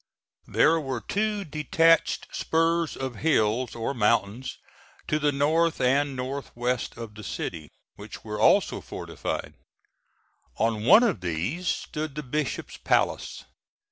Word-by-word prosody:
There 165 Hz, +1 st, +4 dB
were 135 Hz, -5 st, -3 dB
two 210 Hz, -, -1 dB
detached 165 Hz, +2 st, +2 dB
spurs 165 Hz, 0 st, +1 dB
of 130 Hz, -4 st, -4 dB
hills 120 Hz, -4 st, +1 dB
or 115 Hz, +4 st, -2 dB
mountains 115 Hz, +1 st, 0 dB, 0.5 s
to 150 Hz, -, +1 dB
the 150 Hz, -1 st, +2 dB
north 160 Hz, +4 st, +2 dB
and 135 Hz, +2 st, +2 dB
northwest 125 Hz, -2 st, -3 dB
of 115 Hz, -2 st, -7 dB
the 105 Hz, 0 st, -10 dB
city, 80 Hz, -5 st, -5 dB, 0.3 s
which -, -, -10 dB
were -, -, -5 dB
also -, -, +4 dB
fortified. -, -, -5 dB, 1.0 s
On 110 Hz, -1 st, 0 dB
one 210 Hz, -, +8 dB
of 210 Hz, -, +1 dB
these 90 Hz, -, -2 dB
stood 155 Hz, -3 st, -3 dB
the 150 Hz, -, -4 dB
Bishop's 145 Hz, +1 st, -3 dB
Palace. -, -, 0 dB
140 Hz, 125 wpm, -26 LUFS, 115-160 Hz, 1.0 s, one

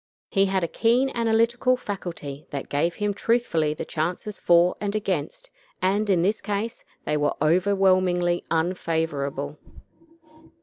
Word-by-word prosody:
He 195 Hz, -2 st, +3 dB
had 190 Hz, -1 st, 0 dB
a -, -, +1 dB
keen 245 Hz, +8 st, +2 dB
analytical 235 Hz, +2 st, +2 dB
faculty 170 Hz, -, -6 dB
that 140 Hz, -, -5 dB
gave 165 Hz, +4 st, 0 dB
him 205 Hz, -1 st, -1 dB
truthfully 195 Hz, -9 st, +1 dB
the -, -, -5 dB
chances 175 Hz, +6 st, -3 dB
for 175 Hz, +1 st, +4 dB
and 205 Hz, 0 st, -2 dB
against, 195 Hz, -, -3 dB, 0.3 s
and, 205 Hz, +3 st, +1 dB
in 180 Hz, -3 st, +3 dB
this 205 Hz, +4 st, +1 dB
case, 210 Hz, +3 st, -3 dB, 0.2 s
they 150 Hz, -, 0 dB
were 145 Hz, 0 st, 0 dB
overwhelmingly 180 Hz, +1 st, +2 dB
unfavorable. 160 Hz, -4 st, -1 dB
185 Hz, 130 wpm, -25 LUFS, 160-210 Hz, 0.3 s, for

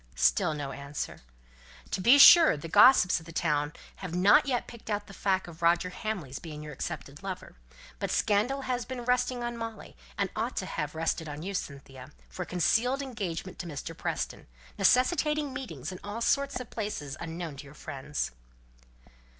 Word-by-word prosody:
Still 65 Hz, -, +2 dB
no 140 Hz, -2 st, -4 dB
answer. 140 Hz, +1 st, -6 dB, 0.7 s
"To -, -, -1 dB
be 245 Hz, +9 st, +7 dB
sure, 325 Hz, -, +9 dB
the 145 Hz, -, -7 dB
gossips 180 Hz, +1 st, +6 dB
of 160 Hz, -, -15 dB
the -, -, -8 dB
town 150 Hz, -3 st, 0 dB, 0.3 s
haven't 190 Hz, -, +4 dB
yet 250 Hz, -3 st, 0 dB
picked 235 Hz, -2 st, -12 dB
out 205 Hz, -1 st, -1 dB
the 195 Hz, -, -13 dB
fact 190 Hz, -1 st, 0 dB
of 165 Hz, -1 st, -12 dB
Roger 170 Hz, +2 st, +3 dB
Hamley's 180 Hz, -11 st, -4 dB
being 150 Hz, -3 st, -8 dB
your 150 Hz, 0 st, -8 dB
accepted 145 Hz, 0 st, -6 dB
lover; 190 Hz, -2 st, -6 dB, 0.5 s
but -, -, -2 dB
scandal 220 Hz, +7 st, +1 dB
has 250 Hz, -2 st, -2 dB
been 250 Hz, -1 st, -6 dB
resting 250 Hz, 0 st, +1 dB
on 240 Hz, 0 st, -3 dB
Molly, 230 Hz, -2 st, -7 dB, 0.2 s
and 200 Hz, -2 st, -1 dB
ought 230 Hz, +4 st, -2 dB
to 190 Hz, -, -1 dB
have 150 Hz, -4 st, -4 dB
rested 160 Hz, 0 st, -1 dB
on 145 Hz, +2 st, -6 dB
you, 200 Hz, +2 st, -4 dB
Cynthia 135 Hz, -6 st, -7 dB, 0.2 s
for -, -, -7 dB
a -, -, -2 dB
concealed 245 Hz, -, +1 dB
engagement 190 Hz, -8 st, -5 dB
to 175 Hz, -, -5 dB
Mr. 165 Hz, +1 st, -6 dB
Preston -, -, -4 dB, 0.3 s
necessitating 300 Hz, -, +2 dB
meetings 165 Hz, -, -6 dB
in 185 Hz, -, -8 dB
all 205 Hz, +3 st, -5 dB
sorts 280 Hz, +3 st, +1 dB
of 250 Hz, -, -9 dB
places 180 Hz, -11 st, -4 dB
unknown 165 Hz, -3 st, -6 dB
to 145 Hz, -, -9 dB
your 140 Hz, +2 st, -14 dB
friends." 145 Hz, 0 st, -4 dB
185 Hz, 175 wpm, -29 LUFS, 150-240 Hz, 0.7 s, sure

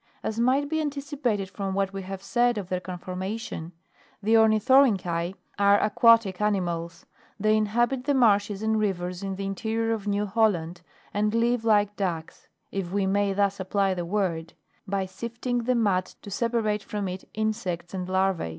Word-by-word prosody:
As 220 Hz, +1 st, -3 dB
might 260 Hz, +4 st, +2 dB
be 315 Hz, +1 st, 0 dB
anticipated 280 Hz, -8 st, -2 dB
from 195 Hz, 0 st, -4 dB
what 195 Hz, 0 st, 0 dB
we 195 Hz, -, -4 dB
have 190 Hz, 0 st, -7 dB
said 240 Hz, +2 st, +2 dB
of 195 Hz, -3 st, -5 dB
their 185 Hz, -, -1 dB
conformation, 185 Hz, 0 st, -5 dB, 0.5 s
the 220 Hz, +3 st, +2 dB
Oruithorynchi 215 Hz, -6 st, +4 dB, 0.2 s
are 200 Hz, 0 st, +5 dB
aquatic 215 Hz, -3 st, +4 dB
animals; 175 Hz, -5 st, -1 dB, 0.3 s
they 215 Hz, +1 st, +3 dB
inhabit 240 Hz, +4 st, +1 dB
the 285 Hz, -1 st, +2 dB
marshes 205 Hz, -4 st, +3 dB
and 220 Hz, 0 st, +1 dB
rivers 180 Hz, -3 st, -2 dB
in 195 Hz, -1 st, -3 dB
the 195 Hz, +1 st, -4 dB
in 195 Hz, -, -2 dB
terior 225 Hz, +3 st, -1 dB
of 210 Hz, -2 st, -5 dB
New 205 Hz, 0 st, +1 dB
Holland, 190 Hz, -5 st, +1 dB, 0.3 s
and 210 Hz, +2 st, +1 dB
live 235 Hz, 0 st, +2 dB
like 205 Hz, -2 st, +3 dB
ducks, 170 Hz, -5 st, -4 dB, 0.2 s
(if 190 Hz, -3 st, -3 dB
we 200 Hz, 0 st, +1 dB
may 200 Hz, +1 st, +1 dB
thus 200 Hz, 0 st, +1 dB
apply 195 Hz, +1 st, +1 dB
the 175 Hz, -1 st, -3 dB
word,) 170 Hz, -3 st, -2 dB, 0.3 s
by 195 Hz, 0 st, -1 dB
sifting 235 Hz, +5 st, -4 dB
the 255 Hz, +1 st, +2 dB
mud 200 Hz, -6 st, +2 dB, 0.2 s
to 200 Hz, -, -9 dB
separate 220 Hz, -1 st, 0 dB
from 205 Hz, 0 st, -4 dB
it 185 Hz, +1 st, -7 dB
insects 210 Hz, -6 st, -2 dB
and 185 Hz, -1 st, -4 dB
larva?. 190 Hz, -, +1 dB
205 Hz, 170 wpm, -26 LUFS, 190-225 Hz, 0.5 s, are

